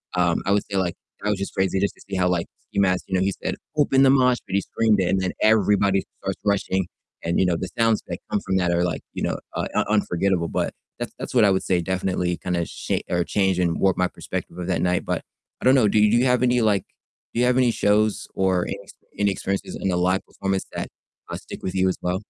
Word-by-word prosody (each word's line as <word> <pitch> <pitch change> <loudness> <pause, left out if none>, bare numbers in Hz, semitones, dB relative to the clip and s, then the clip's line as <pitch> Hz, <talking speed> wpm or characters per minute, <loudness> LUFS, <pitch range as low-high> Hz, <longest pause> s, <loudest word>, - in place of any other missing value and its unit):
um, 85 -2 +2
I 100 - +1
would 100 0 +3
say, 100 - -1
like, 90 -3 0 0.3
that 105 - 0
was 100 - -1
just 100 - -4
crazy 95 0 +1
just 100 +1 0
to - - -20
see 95 - -3
how, 90 0 +2
like, 85 -2 0 0.2
Ski - - -2
Mask, 95 -2 +2
you - - -6
know, 90 - +2
he 95 0 +1
said, - - -1 0.2
"Open 135 -2 +4
the 135 - +6
mosh 125 -2 +4
pit." 95 - -4
He 100 - +3
screamed 110 0 +1
it 95 - +1
and 95 - +2
then 95 - -1
everybody 100 -2 +3 0.2
starts - - -3
rushing 95 -3 +1 0.4
and, 85 +1 0
you - - +4
know, 90 -2 +2
the 90 - -4
sounds 115 -2 +3
that - - -4
come - - +1
from 95 - 0
that 90 -2 +1
are 85 0 +2
like, 90 - -1
you - - -5
know, - - -1 0.2
uh, - - -1
un - - +2
unforgettable, 95 -4 +1
but - - -1 0.3
that's - - -4
that's - - -6
what 115 -4 +6
I 100 - +5
would 95 - +1
say 90 -2 +1
definitely 90 0 -1
kinda 85 -2 -2
sha - - -3
or 90 0 +1
changed, 95 -1 +1
and 85 -2 +1
warped 95 -2 +2
my 90 - +3
perspective 90 - -6
of 90 - -3
that 95 - 0
night. 90 0 +1
But - - -1 0.4
I - - -5
don't 130 - +6
know, 120 -6 +5
do 105 - +3
do 105 +2 +5
you 125 - +3
have 125 -1 +3
any, 125 -1 +3
like 105 -4 +2 0.5
do - - -1
you 125 - +4
have 125 0 +3
any 125 -2 +4
shows, 105 0 +1
or 95 -2 +1
any - - -3
ex - - -15 0.2
any 100 0 +2
experiences 95 0 -3
in 95 - 0
a 90 - +1
live 90 +2 +2
performance 95 -1 -2
that, - - -4 0.4
uh, - - -4
stick - - -10
with 95 - -3
you 95 0 +3
as 95 - -2
well? 90 +3 -1
95 Hz, 265 wpm, -23 LUFS, 90-105 Hz, 0.5 s, the